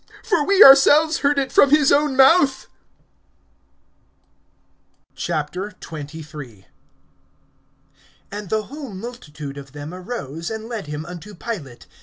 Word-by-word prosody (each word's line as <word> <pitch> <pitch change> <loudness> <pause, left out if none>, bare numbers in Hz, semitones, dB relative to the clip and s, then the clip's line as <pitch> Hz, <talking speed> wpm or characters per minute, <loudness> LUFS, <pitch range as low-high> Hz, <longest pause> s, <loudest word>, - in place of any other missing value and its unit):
For 380 -10 +1
we 395 +6 +6
ourselves 295 +4 +6
heard 285 0 +1
it 270 -1 -1
from 280 - +5
his 295 -1 +4
own 290 -1 +2
mouth. 270 0 +4 2.5
XXIII. 150 - -7 1.7
AND 205 -2 -7
the 215 0 -1
whole 275 -4 -9
multitude 155 - -9
of 140 -1 -13
them 145 +3 -8
arose, 175 - -6
and 220 0 -6
led 225 -8 -6
him 150 +1 -6
unto 180 +4 -10
Pilate. 165 - -7
210 Hz, 110 wpm, -21 LUFS, -, 2.5 s, we